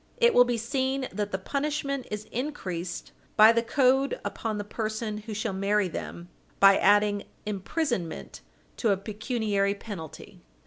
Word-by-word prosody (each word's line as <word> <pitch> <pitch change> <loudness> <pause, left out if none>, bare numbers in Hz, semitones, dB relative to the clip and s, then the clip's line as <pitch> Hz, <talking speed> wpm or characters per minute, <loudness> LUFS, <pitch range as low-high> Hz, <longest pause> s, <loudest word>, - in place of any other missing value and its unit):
It 475 -1 +5
will 245 - +7
be 245 -1 0
seen 265 +2 -1
that 205 +1 -2
the 190 - 0
punishment 280 +4 -2
is 210 0 -5
increased 185 - -4 0.3
by 215 +1 +9
the 230 0 +2
code 265 +2 +2
upon 220 -2 -3
the 205 - -3
person 215 0 -3
who 215 0 -7
shall 215 -1 -2
marry 200 +1 +1
them, 170 0 -6 0.3
by 195 0 +8
adding 205 0 +3 0.2
imprisonment 210 - -3 0.4
to 230 - +1
a 200 - +3
pecuniary 210 -1 -1
penalty. 180 -3 -9
215 Hz, 145 wpm, -27 LUFS, 200-250 Hz, 0.4 s, by